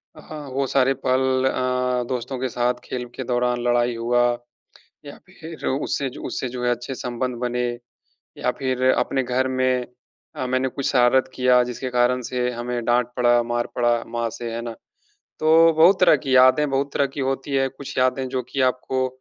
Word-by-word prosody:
अ, 150 -2 -9
वो 135 0 0
सारे 135 0 +2
पल 130 0 +2
अ, 125 -1 0
दोस्तों 130 +1 -4
के 130 - -2
साथ 125 +1 -1
खेल 125 -1 -5
के 130 - -4
दौरान 125 0 0
लड़ाई 120 0 +2
हुआ 120 +1 +1 0.8
या 145 - -10
फिर 165 -3 -9
उससे 135 0 -1
जो - - -10
उससे 130 - -3
जो 125 0 -5
है, 120 - +2
अच्छे 120 +2 -3
संबंध 125 0 -3
बने। 125 0 -1 0.7
या 125 - 0
फिर 130 -2 -2
अपने 135 - +1
घर 130 +1 0
में 130 -1 0 0.5
अ, 130 -4 -3
मैंने 130 +1 0
कुछ 135 +1 -5
शरारत 130 0 +3
किया 125 -1 +4
जिसके 125 +1 -5
कारण 125 +1 +2
से 125 0 0
हमें 120 0 -4
डाँट 120 0 +1
पड़ा, 120 -1 +4
मार 120 0 -2
पड़ा 120 -1 +1
माँ 120 0 -2
से, 115 +1 -6
है 115 - -3
ना? 115 -1 -6 0.7
तो 165 +1 +5
बहुत 180 +4 +6
तरह 180 -4 +6
की 130 -1 -1
यादें 130 +3 +5
बहुत 140 +1 -1
तरह 140 - +2
की - - -6
होती 135 +2 -2
है, 135 0 +2
कुछ 135 +1 -10
यादें 130 +1 +1
जो 130 - -2
कि 135 - -1
आपको 130 0 -1
125 Hz, 185 wpm, -22 LUFS, 120-135 Hz, 0.8 s, बहुत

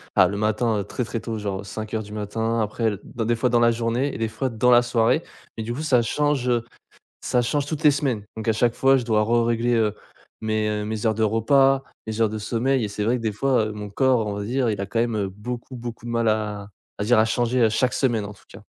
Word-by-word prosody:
Ah - - +6
le 100 - -4
matin, 110 +1 +1
heu, - - -2
très, 125 +5 -4
très 115 - -4
tôt 115 -2 -4
genre 100 -1 -4
05:00 110 +3 -4
du 105 - -12
matin 110 +2 -2
après 110 +2 -2
l 105 -3 -1
dans 115 -2 -4
des 120 +1 +2
fois 125 +2 +1
dans 120 0 +3
la 120 0 +5
journée 120 +4 -1
et - - -5
des 115 0 -1
fois 130 +4 -3
dans 120 +2 +2
la 120 0 +7
soirée 120 +5 +2 0.3
et 110 - -3
du 120 +2 -3
coup 145 - -5
ça 130 -6 +3
change, 140 +1 0
heu, 120 -1 +1 0.6
ça 125 - +1
change 140 +4 0
toutes 155 0 -4
les 150 - +7
semaines. 135 -7 -1
Donc 110 0 -6
à 110 - +4
chaque 115 +1 +2
fois 135 0 +4
je 125 - -3
dois 110 -2 +2
rerégler, 120 +1 +1
heu, 110 -2 +2 0.5
mes 110 -1 0
heu, 105 0 -2
mes 110 +1 -4
heures 110 - +2
de 110 - 0
repas, 135 +5 +3 0.2
mes 110 0 -4
heures 110 - +4
de 110 - -4
sommeil 120 +4 0
et - - -1
c'est 105 +1 -3
vrai 125 +2 +2
que - - -7
des 110 -2 -1
fois, 120 0 +1
heu, - - -5
mon 105 -1 -7
corps 125 +1 +2
on 105 - -2
va 105 - -4
dire 125 +3 0
il 105 -2 -2
a - - -2
quand 115 +3 -2
même, 120 -1 0
heu, 100 -2 -1
beaucoup 120 +6 -7
beaucoup 120 -1 -7
de - - -5
mal 115 -1 +1
à 105 -2 -1 0.3
on - - 0
va - - -3
dire 120 -1 +4
à 110 - +5
changer 120 +2 +1
à 110 - +5
chaque 125 +3 +1
semaine 120 -6 +1
en 105 - -8
tout - - -21
cas. - - -13
115 Hz, 280 wpm, -23 LUFS, 110-125 Hz, 0.6 s, la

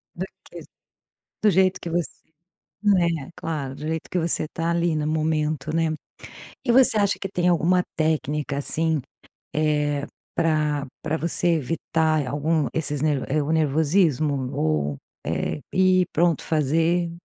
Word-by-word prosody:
Do - - -3 0.2
que? - - -10 0.8
Do 215 - +6
jeito 185 0 +3
que 170 - -5
você 170 0 0 0.7
né, 170 -8 +2
claro. 145 -5 -4
Do - - -11
jeito 160 0 -3
que 185 - 0
você 165 -2 0
tá 165 +1 -2
ali 170 -1 +1
no 150 -1 -1
momento, 155 -1 -1
né? 165 -1 +2 0.8
E 240 - +2
você 250 -4 +5
acha 200 -1 +2
que 195 - -3
tem 180 -2 -1
alguma 175 +1 +3
técnica, 150 -3 0
assim, 160 +2 0 0.5
eh, 150 -2 +1 0.3
pra 150 -3 +1 0.2
pra 155 0 -1
você 170 +2 0
evitar 160 0 0
algum 150 +3 0
esses 150 -3 -2
nerv 145 -3 +1
eh, 150 +2 +1
o 145 - -2
nervosismo 150 -3 +2
ou, 75 -2 0 0.3
eh, - - -2
ir, 185 -1 +4
pronto, 170 0 +2
fazer? 165 +3 +1
160 Hz, 145 wpm, -24 LUFS, 150-170 Hz, 0.8 s, Do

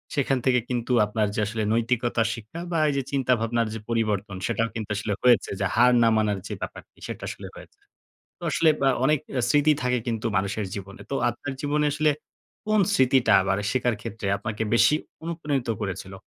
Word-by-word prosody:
সেখান 135 -1 +1
থেকে 125 -1 +4
কিন্তু 125 0 -2
আপনার 105 0 0
যে - - -1
আসলে 110 0 -2
নৈতিকতার 115 -1 +1
শিক্ষা 115 +9 -9
বা 165 - 0
এই - - 0
যে 135 - 0
চিন্তাভাবনার 120 -4 +1
যে 110 - -5
পরিবর্তন 105 -4 -1
সেটাও 115 -1 0
কিন্তু 110 -2 -5
আসলে 105 0 -2
হয়েছে 120 -5 +4
যে 100 - 0
হার 125 +2 +6
না - - +5
মানার 105 -2 +1
যে - - -5
ব্যাপারটা - - -7 0.2
সেটা - - -7
আসলে - - -7
হয়েছে। - - -14 0.6
তো - - -23
আসলে 160 -1 +4
বা 135 - +4 0.2
অনেক 150 +1 +3 0.3
স্মৃতি 150 +1 +4
থাকে 125 0 +1
কিন্তু 115 -1 -2
মানুষের 100 +1 -1
জীবনে। 100 -1 -8
তো - - -1 0.2
আপনার 130 +4 -6
জীবনে 150 +1 0
আসলে 155 0 +2 0.6
কোন 215 -1 +3
স্মৃতিটা 130 - +4 0.4
শেখার 125 -2 +1
ক্ষেত্রে 105 -1 -6
আপনাকে 110 0 -4
বেশি 150 - +5 0.3
অনুপ্রাণিত 150 -7 -2
করেছিল? 95 -1 -5
115 Hz, 175 wpm, -25 LUFS, 110-135 Hz, 0.6 s, হার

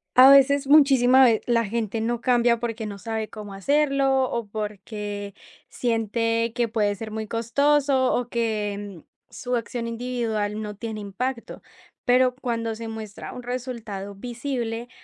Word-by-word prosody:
A 255 +1 +9
veces, 275 0 +6
muchísima 265 -3 +6
ve 230 -3 +4
la 235 -1 +2
gente 225 0 -2
no 235 +1 -1
cambia 240 -1 +3
porque 230 -2 -4
no 200 -1 -6
sabe 220 +1 -4
cómo 210 -2 -9
hacerlo 275 +3 +2
o 235 -2 -3
porque 205 -1 -6 0.4
siente 230 0 0
que 240 0 0
puede 210 -2 0
ser 215 +2 -7
muy 220 0 -4
costoso, 265 +4 +2
o 245 - -1
que 205 -6 -3 0.3
su 250 0 -3
acción 235 0 -3
individual 230 -3 -2
no 210 -1 -6
tiene 220 0 -6
impacto, 230 +5 -5 0.4
pero 250 0 +3
cuando 230 -3 -3
se 225 0 -7
muestra 220 -2 -7
un 250 - -8
resultado 235 -5 -5
visible, 240 +1 -4
230 Hz, 145 wpm, -24 LUFS, 215-250 Hz, 0.4 s, A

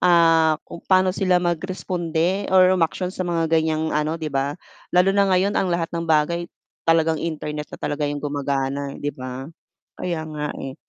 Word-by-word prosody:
ah, 165 -3 +5
kung 170 - -10
paano 185 -1 +4
sila 185 -1 +2
mag-responde 175 +1 -1
or 185 0 +6
umaksiyon 180 +1 0
sa 185 -2 -3
mga 165 -1 +1
gan'yang 160 -1 +1
ano, 150 +2 0
'di 155 -3 -5
ba? 140 +2 -1 0.3
Lalo 180 +2 +4
na 200 0 +3
ngayon 190 +2 +2
ang 190 - +1
lahat 170 -1 -1
ng 170 -1 -3
bagay 170 +2 +2 0.4
talagang 160 -1 +3
internet 150 -2 -4
na - - -9
talaga 145 0 -2
'yong 145 0 -4
gumagana, 140 -1 -2
'di 145 0 -3
ba? 130 0 -7 0.5
Kaya 165 -3 -3
nga, 150 -1 -4
eh. 135 0 -6
165 Hz, 170 wpm, -22 LUFS, 150-180 Hz, 0.5 s, or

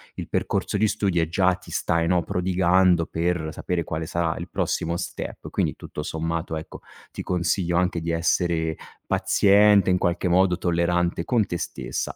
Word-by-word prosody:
il - - -6
percorso - - -1
di 105 +1 +2
studi, 95 -4 0
e 80 - -1
già 90 +1 +3
ti 95 - -14
stai, 85 0 0
no, 90 -1 +3
prodigando 90 0 +2
per 85 -2 -2
sapere 85 0 -2
quale 80 0 -4
sarà 85 -1 -1
il - - -7
prossimo 85 +1 -1
step. - - -6
Quindi - - -1
tutto 75 - -7
sommato, 80 +1 -3
ecco, 80 - -9 0.3
ti - - -5
consiglio 85 0 0
anche 90 -2 0
di 85 0 -2
essere 85 -1 0 0.3
paziente, 100 -1 +4
in 90 - +3
qualche 90 +1 0
modo 90 0 +3
tollerante 85 0 0
con 115 -4 +2
te 85 - -3
stessa, 85 - -4
85 Hz, 170 wpm, -24 LUFS, 85-90 Hz, 0.3 s, paziente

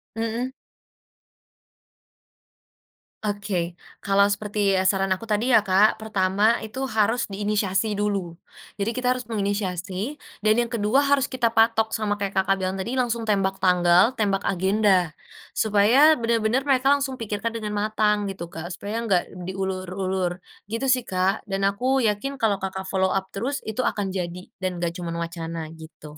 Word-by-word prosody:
Mhm. 230 +3 -2 2.7
Oke 200 -4 -2 0.2
kalau 200 0 +4
seperti, 205 -1 0
ya, 185 - +2
saran 195 0 +2
aku 185 - -12
tadi 225 +3 0
ya, 220 -4 +5
Kak, 200 +3 +4
pertama 205 +2 +2
itu 245 +5 -5
harus 225 0 +1
diinisiasi 205 0 0
dulu. 200 -5 -1 0.4
Jadi 205 +3 -1
kita 255 0 +1
harus 255 - -6
menginisiasi, 200 - -3 0.2
dan 215 0 +5
yang 235 - -3
kedua 225 +3 +2
harus 280 -1 +3
kita 245 -3 +1
patok 225 0 +3
sama 205 -2 -1
kayak 200 0 -3
Kakak 195 +1 +3
bilang 185 0 -1
tadi 205 +6 -3
langsung 235 -2 0
tembak 195 -2 +1
tanggal, 180 +5 +4
tembak 200 -2 +1
agenda, 190 -1 +2 0.5
supaya 225 +9 +5
bener-bener 230 +2 +1
mereka 270 0 +3
langsung 275 -2 -1
pikirkan 225 0 -3
dengan 210 -2 -4
matang 210 -1 +1
gitu, 190 -3 -6
Kak, 165 +2 -6
supaya 215 +4 -4
gak 180 -2 +3 0.2
diulur-ulur 185 -1 -2 0.3
gitu 230 +4 -2
sih, 255 -1 +3
Kak, 185 +2 0
dan 195 0 0
aku 250 +5 +1
yakin 245 +7 -1
kalau 205 -4 +1
Kakak, 190 0 -4
follow 190 0 +1
up 190 0 0
terus 250 +8 -2
itu 220 +3 -2
akan 200 -5 -1
jadi 180 -1 -5
dan 185 -1 -2
gak 170 -1 -2
cuman 170 -1 -4
wacana 165 -1 -4
gitu. 155 -2 -12
205 Hz, 150 wpm, -24 LUFS, 190-225 Hz, 2.7 s, ya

